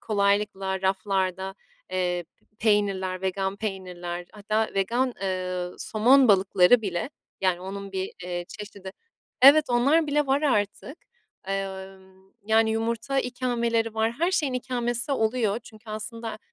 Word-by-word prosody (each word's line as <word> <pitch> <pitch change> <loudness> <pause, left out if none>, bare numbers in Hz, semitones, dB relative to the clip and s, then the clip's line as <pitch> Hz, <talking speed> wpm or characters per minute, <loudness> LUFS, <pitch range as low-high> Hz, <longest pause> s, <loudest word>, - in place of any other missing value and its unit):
kolaylıkla 200 -2 0
raflarda, 190 -1 -1 0.4
eee, 180 -1 -1 0.2
p 210 - -38
peynirler, 195 -4 +1
vegan 190 +1 -1
peynirler 180 -4 -5
hatta 215 +1 -1
vegan, 240 +6 0
eee, 185 -1 -2
somon 250 +4 +4
balıkları 195 +3 +5
bile, 190 - -3 0.3
yani, 185 -2 +1
onun 195 +1 -7
bir, 190 0 -3
eee, 175 -1 -4
çeşidi. 200 -3 -9 0.5
Evet, 295 +3 +9
onlar 285 +7 +3
bile 295 0 +1
var 275 +3 +1
artık, 255 - 0 0.5
emm, 190 -1 -6
yani, 220 0 +4
yumurta 230 +4 -1
ikameleri 235 -3 -1
var, 220 +1 +1
her 340 +8 0
şeyin 295 -8 0
ikamesi 245 0 -2
oluyor 225 -2 +1
çünkü 220 -1 -13
aslında, 220 +1 -5
210 Hz, 125 wpm, -26 LUFS, 190-235 Hz, 0.5 s, Evet